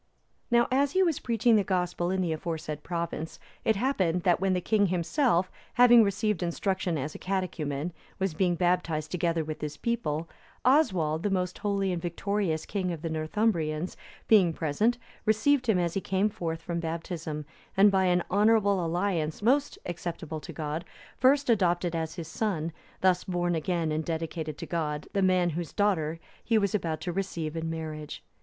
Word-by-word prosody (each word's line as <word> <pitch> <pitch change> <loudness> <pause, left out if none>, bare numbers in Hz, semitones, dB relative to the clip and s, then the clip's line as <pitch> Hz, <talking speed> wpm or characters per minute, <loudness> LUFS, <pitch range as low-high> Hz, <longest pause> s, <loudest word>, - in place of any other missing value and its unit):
Now, 235 -1 +4
as 275 +2 +2
he 380 - +4
was 335 -5 +1
spreading 230 -1 +3
the 205 - +3
Gospel 180 -2 -1
in 190 0 0
the 170 -3 0
aforesaid 155 -2 -4
province, 170 -1 -4 0.3
it 220 - +3
happened 190 -7 +1
that 175 -2 +3
when 190 0 +1
the 180 - +1
king 205 +2 +2
himself, 185 - +1 0.2
having 240 -1 +8
received 205 -1 0
instruction 180 0 -1
as 145 +2 -3
a - - -9
catechumen, 175 -5 -2 0.2
was 190 -3 -1
being 175 +1 +1
baptized 170 -3 0
together 170 -2 0
with 155 0 -6
his 150 -1 -4
people, 170 -9 -1 0.4
Oswald, 185 - +3
the 205 - 0
most 185 -1 -1
holy 200 -2 0
and 175 -2 -2
victorious 175 -1 -1
king 185 -3 -2
of 165 -2 -6
the 165 - -2
Northumbrians, 160 0 0 0.3
being 190 -7 +5
present, 170 +11 +1 0.3
received 245 +4 +3
him 210 - +4
as 170 -2 0
he 195 - -1
came 195 +3 +1
forth 165 -3 -4
from 170 0 -2
baptism, 160 -2 -4 0.3
and 200 +1 +7
by 190 -1 +3
an 180 -1 +3
honourable 205 -2 +4
alliance 170 -1 -1
most 280 +5 +2
acceptable 170 -2 -5
to - - -9
God, 155 +1 -4 0.3
first 275 +2 +3
adopted 175 -6 +2
as 160 -1 -3
his 170 -3 -6
son, 170 -4 -2 0.3
thus 185 -1 +3
born 175 -1 -1
again 165 0 -1
and 155 +1 -1
dedicated 160 -2 -3
to - - -6
God, 150 -3 -2
the 200 - +1
man 185 -2 +3
whose 170 +1 -4
daughter(320) 165 -6 +1 0.3
he 230 - +2
was 200 -3 +1
about 165 -6 -1
to 175 +1 -3
receive 170 -4 -3
in 165 0 -2
marriage. 155 -2 -6
175 Hz, 175 wpm, -28 LUFS, 160-200 Hz, 0.4 s, having